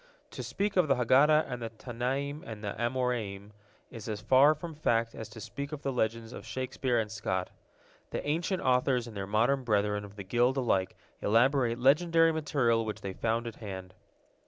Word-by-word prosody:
To - - -6
speak 200 0 -2
of 180 -4 +4
the 135 - +4
Haggadah 140 +6 +4
of 125 - -4
the 115 -1 -4
Tannaim 130 +6 -3
and 110 -2 -8
Amoraim 115 -3 -2 0.4
is 115 -1 -8
as 105 -1 -3
far 130 +8 +5
from 165 +2 -7
fact 115 -6 0
as 110 -1 -7
to 110 +1 -11
speak 140 +7 -6
of 150 -1 -6
the 135 - -1
legends 115 0 -1
of - - -8
Shakespeare 130 -1 -2
and 105 -2 -2
Scott. 95 -4 -2 0.6
The - - -4
ancient 170 +5 -1
authors 125 -1 +2
and 115 -3 -10
their 95 -1 -4
modern 120 +6 +2
brethren 105 -3 +1
of 100 0 -11
the 100 - -7
guild 120 +7 +2
alike 95 -8 +1 0.3
elaborate 120 +2 +3
legendary 165 +5 +4
material 135 -7 +1
which 110 -1 -5
they 95 - -5
found 115 +3 -1
at 115 - -6
hand. 95 -4 -7
120 Hz, 180 wpm, -30 LUFS, 110-140 Hz, 0.6 s, far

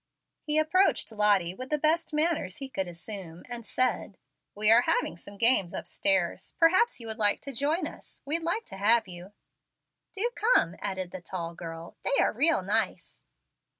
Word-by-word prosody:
He 300 0 0
approached 325 -1 +2
Lottie 205 -5 +2
with 255 +6 -9
the 300 - +1
best 320 +3 +1
manners 300 - 0
he 270 -1 -7
could 190 -7 -3
assume, 175 -1 -7
and 240 -1 -6
said, 245 -4 -1 0.4
"We 210 +1 +7
are 230 +2 +7
having 170 - 0
some 200 +4 -11
games 225 -6 +4
upstairs. 290 0 -1
Perhaps 370 - +3
you 230 - -6
would 220 -1 -4
like 205 -1 +3
to 275 - -8
join 300 +7 -1
us. - - -9
We'd 315 +4 +1
like 345 +8 -2
to 195 - -10
have 220 +2 +3
you." 180 +2 -10 0.8
"Do 455 +5 0
come," 420 - +3
added 190 -3 -4
the 185 - -8
tall 170 -1 -6
girl; 165 0 -9
"they 275 - 0
are - - +2
real 285 - +2
nice." 215 +4 -3
225 Hz, 175 wpm, -28 LUFS, 190-300 Hz, 0.8 s, We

